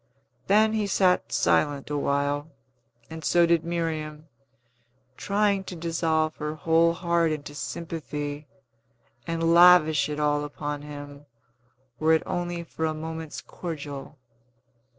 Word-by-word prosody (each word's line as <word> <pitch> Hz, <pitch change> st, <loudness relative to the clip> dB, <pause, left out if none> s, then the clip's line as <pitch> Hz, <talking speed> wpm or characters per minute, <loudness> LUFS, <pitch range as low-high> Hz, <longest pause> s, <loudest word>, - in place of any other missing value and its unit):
Then 215 Hz, +2 st, +4 dB
he 215 Hz, -2 st, 0 dB
sat 185 Hz, -2 st, +2 dB
silent 145 Hz, -1 st, +1 dB
awhile, 145 Hz, +1 st, -1 dB, 0.6 s
and 160 Hz, 0 st, -7 dB
so 175 Hz, -1 st, +4 dB
did 170 Hz, -1 st, +2 dB
Miriam, 160 Hz, -2 st, -3 dB, 0.9 s
trying 200 Hz, +1 st, +1 dB
to 180 Hz, -, -7 dB
dissolve 160 Hz, -1 st, 0 dB
her 150 Hz, 0 st, -4 dB
whole 165 Hz, +2 st, +3 dB
heart 170 Hz, -1 st, +1 dB
into 145 Hz, -1 st, -5 dB
sympathy, 150 Hz, -2 st, -5 dB, 0.8 s
and 165 Hz, 0 st, +1 dB
lavish 170 Hz, -4 st, +6 dB
it 150 Hz, 0 st, -4 dB
all 145 Hz, 0 st, +1 dB
upon 145 Hz, 0 st, -5 dB
him, 145 Hz, 0 st, -10 dB, 0.7 s
were 160 Hz, +1 st, +4 dB
it 160 Hz, -, +2 dB
only 175 Hz, -1 st, -3 dB
for 160 Hz, -1 st, -4 dB
a 155 Hz, 0 st, -1 dB
moment's 160 Hz, 0 st, -6 dB
cordial. 145 Hz, -4 st, -7 dB
160 Hz, 120 wpm, -26 LUFS, 150-170 Hz, 0.9 s, lavish